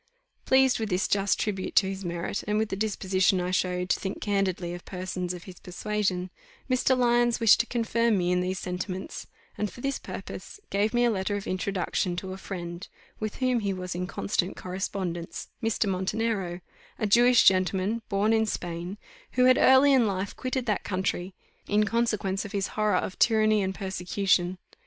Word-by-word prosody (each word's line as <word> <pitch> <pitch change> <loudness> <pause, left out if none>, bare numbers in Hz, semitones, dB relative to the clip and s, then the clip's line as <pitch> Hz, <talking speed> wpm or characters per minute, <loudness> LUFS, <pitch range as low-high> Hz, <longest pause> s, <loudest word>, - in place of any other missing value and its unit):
Pleased 265 -1 +4
with 220 -2 -2
this 180 +2 +1
just 200 0 +1
tribute 195 -3 -2
to 190 +1 +5
his 195 0 -5
merit, 175 +2 -3
and 210 0 +1
with 220 0 0
the - - -2
disposition 190 -2 +1
I 180 0 -2
showed 180 -1 0
to - - +2
think 195 - -4
candidly 190 -4 -1
of 175 - -8
persons 180 -1 -4
of 180 -1 -7
his 185 -2 -12
persuasion, 185 -1 -2 0.4
Mr. 255 0 +2
Lyons 240 -1 +3
wished 230 -2 +6
to 235 - +1
confirm 230 -2 +1
me 180 -1 +1
in 180 0 +2
these 185 +1 -2
sentiments, 185 +1 -5 0.3
and 210 -1 -1
for 245 - -11
this 275 +1 -1
purpose - - -8
gave 205 +2 +1
me 240 0 +4
a 240 - +3
letter 200 0 -1
of 200 - -4
introduction 185 -1 -1
to 185 +1 -5
a - - -7
friend, 175 -1 -6 0.3
with 215 -1 -3
whom 255 -2 +1
he 200 -3 -1
was 185 -1 -5
in 180 +1 -3
constant 195 -1 -2
correspondence, 180 -2 -4
Mr. 225 -2 0
Montenero, 190 -1 -1 0.4
a - - -1
Jewish 240 +3 +6
gentleman 190 +4 +3
born 205 +2 +2
in 220 0 +2
Spain, 175 0 -4 0.4
who 250 0 +4
had 255 0 +6
early 265 +2 +6
in 250 -4 +4
life 195 0 -3
quitted 255 -1 -2
that 210 -4 0
country, 185 -1 -2 0.3
in 210 +1 +3
consequence 215 -4 0
of 205 - -8
his 200 -1 -1
horror 210 -3 +1
of 185 - -3
tyranny 215 -2 +4
and 190 0 -2
persecution. 185 -1 0
195 Hz, 185 wpm, -27 LUFS, 185-220 Hz, 0.4 s, wished